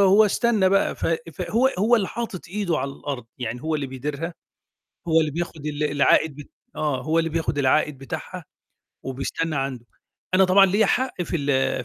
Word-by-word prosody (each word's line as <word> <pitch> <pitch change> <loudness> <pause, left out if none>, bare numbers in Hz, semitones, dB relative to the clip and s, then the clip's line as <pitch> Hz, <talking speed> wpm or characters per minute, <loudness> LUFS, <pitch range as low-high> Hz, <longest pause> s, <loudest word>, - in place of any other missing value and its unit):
وهو 200 +2 +6
استنّى 210 -2 +2
بقى، 195 +1 +2
ف - - -2 0.3
فهو 240 - +1
هو 230 +4 +4
اللي 195 -4 0
حاطط 230 -6 -4
إيده 180 -4 -1
على 140 - -2
الأرض، 135 -5 -6
يعني 125 +1 -4
هو 160 0 -1
اللي 145 -3 -1
بيديرها، 145 +6 -5 0.7
هو 160 0 +5
اللي 155 -1 0
بياخُد 160 -1 -5
ال 150 0 -3
العائد 145 +1 +3
ب 145 - -9 0.3
آه، 150 -4 -1
هو 160 +1 +1
اللي 165 0 +1
بياخُد 160 -2 -1
العائد 145 +1 +2
بتاعها 135 -1 -7 0.6
وبيستنّى 140 +4 -3
عنده. 135 -3 -3 0.5
أنا 190 +1 +6
طبعًا 195 +2 +6
ليّا 205 +3 +3
حق 250 -6 0
في 170 - -2
ال 135 -3 0
155 Hz, 175 wpm, -24 LUFS, 140-190 Hz, 0.7 s, وهو